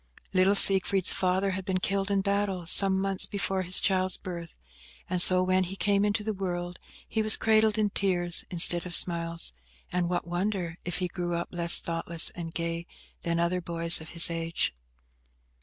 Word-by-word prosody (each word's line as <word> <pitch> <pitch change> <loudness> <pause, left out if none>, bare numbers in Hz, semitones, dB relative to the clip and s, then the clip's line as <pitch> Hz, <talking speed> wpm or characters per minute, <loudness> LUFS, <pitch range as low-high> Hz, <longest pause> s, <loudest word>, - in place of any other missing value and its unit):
Little 190 +2 +2
Siegfried's 195 -1 +6
father 190 +1 -1
had 190 0 -6
been 185 0 -3
killed 195 +1 -2
in 200 -1 0
battle, 200 -2 -3
some 190 +2 +3
months 195 -1 +1
before 195 -2 -3
his 180 0 0
child's 185 -1 -1
birth, 170 -3 -9 0.5
and 180 -1 +5
so, 185 0 +4
when 185 0 0
he 190 +2 -8
came 200 0 0
into 210 +1 -2
the 220 0 -4
world, 175 -2 -6 0.3
he 220 - -3
was 215 0 +3
cradled 220 -1 +1
in 210 -2 -1
tears 175 -4 -1
instead 175 0 +1
of 175 - +1
smiles; 170 - 0 0.4
and 175 -1 -2
what 175 -1 -3
wonder 175 -1 -4
if 175 -1 -3
he 180 0 -3
grew 175 -1 -5
up 170 - -5
less 170 -1 +6
thoughtless 165 0 0
and 165 -1 -9
gay 170 0 -5 0.3
than 170 0 -3
other 175 +1 -2
boys 170 -1 +2
of 160 - -11
his 170 0 +3
age? 165 - -3
180 Hz, 180 wpm, -26 LUFS, 170-195 Hz, 0.5 s, Siegfried's